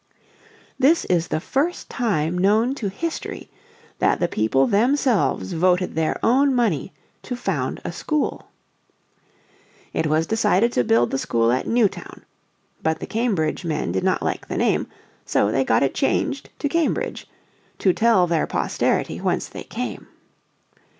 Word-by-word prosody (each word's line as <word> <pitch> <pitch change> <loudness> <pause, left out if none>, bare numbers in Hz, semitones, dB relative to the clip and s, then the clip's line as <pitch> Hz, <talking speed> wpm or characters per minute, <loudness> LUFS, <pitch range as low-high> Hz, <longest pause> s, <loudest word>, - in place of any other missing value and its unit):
This 295 +6 +4
is 175 -2 +1
the - - -1
first 290 - -1
time 180 -9 -1
known 215 +7 +3
to 220 -7 -3
history 330 - -5 0.5
that - - +2
the 175 - +1
people 135 +1 +2
themselves 225 - +1
voted 180 +2 +2
their 160 -1 0
own 270 +3 +3
money 200 - 0 0.3
to 250 - -5
found 245 - -2
a - - -2
school. 305 -2 -2 1.5
It 160 - 0
was 155 +2 +2
decided 220 +2 +2
to 125 - +1
build 115 +1 +2
the 135 - -1
school 115 -2 +1
at 130 - -1
"Newtown." 230 -4 -1 0.6
But 160 0 0
the - - -5
Cambridge 200 -9 -1
men 155 - -2
did 95 +1 -1
not - - +1
like - - -3
the - - -4
name, - - +1 0.4
so 100 - +1
they 135 - +2
got 115 0 +2
it 135 - +1
changed 275 0 -1
to 290 - -1
Cambridge, 330 +2 -1 0.5
"to 185 - +2
tell 220 -4 +4
their 170 -2 0
posterity - - -1
whence - - -1
they - - -9
came." - - -5
190 Hz, 150 wpm, -22 LUFS, 155-245 Hz, 1.5 s, This